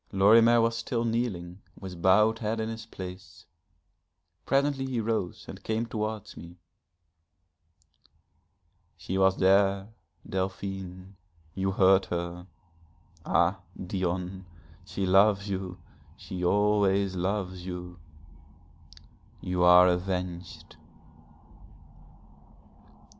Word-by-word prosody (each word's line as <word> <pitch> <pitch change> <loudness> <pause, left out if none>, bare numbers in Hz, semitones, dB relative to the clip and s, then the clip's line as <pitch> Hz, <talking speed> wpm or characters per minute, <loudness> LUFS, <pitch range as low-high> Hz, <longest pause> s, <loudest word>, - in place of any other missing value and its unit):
Lorimer 115 +4 +5
was 115 0 +1
still 120 -2 -2
kneeling 100 -6 -3 0.2
with 90 -3 -8
bowed 105 +5 +4
head 110 0 -2
in 110 0 -2
his 115 0 -7
place. 95 -2 -10 1.0
Presently 135 -1 +1
he 125 -3 -2
rose 110 -5 -2
and - - -9
came 110 +1 -1
towards 110 -2 -5
me. 85 +1 -12 2.4
'She 95 +1 -3
was 95 0 +3
there 95 +1 +3 0.4
Delphine 95 0 -5 0.4
you 95 +2 -1
heard 95 0 +4
her. 85 +1 -5 0.8
Ah, 85 +3 +2 0.2
Dion, 90 0 -3 0.4
she 100 - -3
loves 100 +2 +4
you, 95 -1 -4 0.4
she 90 -1 -7
always 100 0 +2
loves 95 0 -3
you, 90 -1 -7 1.4
you 90 -1 -2
are 90 +1 +8
avenged.' 90 -2 -3
95 Hz, 95 wpm, -28 LUFS, 90-105 Hz, 2.4 s, are